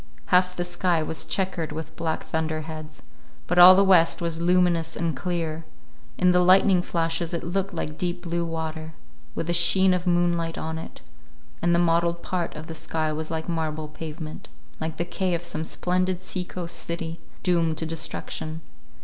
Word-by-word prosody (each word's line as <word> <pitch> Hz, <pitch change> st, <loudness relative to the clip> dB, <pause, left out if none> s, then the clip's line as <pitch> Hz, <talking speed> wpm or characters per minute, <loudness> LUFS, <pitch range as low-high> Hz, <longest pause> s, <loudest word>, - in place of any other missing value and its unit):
Half 180 Hz, 0 st, +4 dB
the 175 Hz, -, -2 dB
sky 175 Hz, -2 st, 0 dB
was 160 Hz, +1 st, -2 dB
checkered 185 Hz, -5 st, -1 dB
with 160 Hz, +1 st, -6 dB
black 165 Hz, -1 st, -2 dB
thunderheads, 155 Hz, -1 st, -4 dB, 0.4 s
but 175 Hz, +1 st, +1 dB
all 180 Hz, +1 st, +11 dB
the 195 Hz, -, +5 dB
west 180 Hz, -4 st, +5 dB
was 170 Hz, -1 st, -2 dB
luminous 175 Hz, -2 st, +2 dB
and 165 Hz, -3 st, -1 dB
clear: 165 Hz, 0 st, -3 dB, 0.5 s
in 180 Hz, 0 st, +4 dB
the 180 Hz, -, +4 dB
lightning 185 Hz, +1 st, +5 dB
flashes 165 Hz, 0 st, -1 dB
it 170 Hz, -, -4 dB
looked 195 Hz, +3 st, -1 dB
like 155 Hz, -3 st, -5 dB
deep 175 Hz, 0 st, -2 dB
blue 170 Hz, 0 st, -1 dB
water, 160 Hz, -1 st, -4 dB, 0.4 s
with -, -, -2 dB
the 170 Hz, -, 0 dB
sheen 185 Hz, +2 st, +5 dB
of 180 Hz, 0 st, -1 dB
moonlight 175 Hz, -1 st, +1 dB
on 160 Hz, 0 st, -4 dB
it; -, -, -10 dB, 0.6 s
and 175 Hz, 0 st, +3 dB
the -, -, +3 dB
mottled 170 Hz, 0 st, +2 dB
part 175 Hz, -2 st, -2 dB
of 155 Hz, +1 st, -7 dB
the 165 Hz, -, -7 dB
sky 155 Hz, -1 st, -2 dB
was 155 Hz, +1 st, -4 dB
like 160 Hz, -1 st, -3 dB
marble 155 Hz, -2 st, -2 dB
pavement, 155 Hz, +1 st, -8 dB, 0.3 s
like 160 Hz, 0 st, -4 dB
the 170 Hz, -, -1 dB
quay 180 Hz, 0 st, -1 dB
of 170 Hz, -, -4 dB
some 160 Hz, -2 st, -4 dB
splendid 180 Hz, +2 st, 0 dB
sea 185 Hz, 0 st, -4 dB
coast 175 Hz, -1 st, -4 dB
city, 170 Hz, -1 st, -4 dB, 0.2 s
doomed 165 Hz, -3 st, +2 dB
to 160 Hz, -, -1 dB
destruction. 160 Hz, 0 st, -4 dB
170 Hz, 175 wpm, -25 LUFS, 160-180 Hz, 0.6 s, all